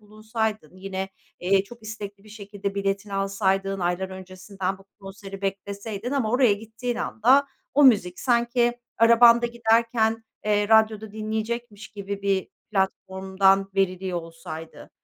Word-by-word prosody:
bulunsaydın, 215 -4 -4
yine, 190 0 -4 0.3
eee, 190 +2 +2
çok 235 +3 -14
istekli 205 -2 -8
bir - - -16
şekilde 200 -1 -6
biletini 200 0 -2
alsaydın, 195 0 0
aylar 180 +2 -1
öncesinden 190 0 -5
bu 195 - -18 0.2
konseri 195 0 -9
bekleseydin 200 +3 -4
ama 265 -6 0
oraya 250 -2 +4
gittiğin 225 +4 -4
anda 265 +6 +3 0.3
o 290 0 +6
müzik 195 -8 +4
sanki 240 0 +2 0.2
arabanda 235 +1 +7
giderken, 225 -1 +1 0.2
eee, 205 -1 +1
radyoda 220 -1 +3
dinleyecekmiş 220 0 -4
gibi 200 -1 -6
bir 195 -2 0 0.2
platformdan 190 0 +1
veriliyor 185 -1 0
olsaydı, 165 -1 -10
205 Hz, 125 wpm, -25 LUFS, 195-225 Hz, 0.3 s, arabanda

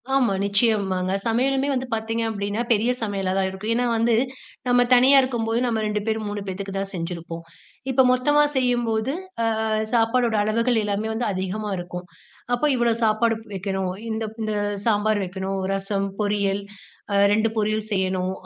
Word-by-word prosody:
ஆமா. 245 -7 +3
நிச்சயமாங்க. 200 -3 +1
சமையலுமே 265 +4 +1
வந்து 255 0 -2
பாத்தீங்க 225 +1 -1
அப்படின்னா, 205 +1 -2
பெரிய 225 +4 +2
சமையலா 195 -3 -1
தான் 190 0 +2
இருக்கும். 190 +4 -4
ஏன்னா 245 +1 +1
வந்து, 230 +1 +2 0.5
நம்ம 245 0 +4
தனியா 260 +3 +7
இருக்கும்போது 235 -3 -1
நம்ம 225 -3 0
2 210 0 -1
பேர், 220 0 0
3 205 0 -4
பேத்துக்கு 195 +1 -5
தான் 195 0 -4
செஞ்சிருப்போம், 170 -1 -5 0.5
இப்போ 260 +1 +5
மொத்தமா 295 +4 +3
செய்யும்போது 240 -1 +1 0.6
அ - - 0 0.2
சாப்பாடோட 230 0 +2
அளவுகள் 230 +2 +1
எல்லாமே 210 +1 -1
வந்து 235 +2 -2
அதிகமா 190 +3 -3
இருக்கும். 180 0 -6 0.5
அப்போ 300 +5 +1
இவ்வளோ 235 -2 +2
சாப்பாடு 225 +1 +3
ப் - - -22
வெக்கணும். 190 -1 -2 0.2
இந்த 220 0 -2 0.2
இந்த 215 0 -1 0.3
சாம்பார் 215 -1 +2
வெக்கணும். 190 +1 -4
ரசம் 195 0 -1
பொரியல், 200 -1 0 0.5
அ - - +1 0.2
2 220 +2 +3
பொரியல் 215 0 0
செய்யணும், 185 -1 0
215 Hz, 155 wpm, -23 LUFS, 195-235 Hz, 0.6 s, தனியா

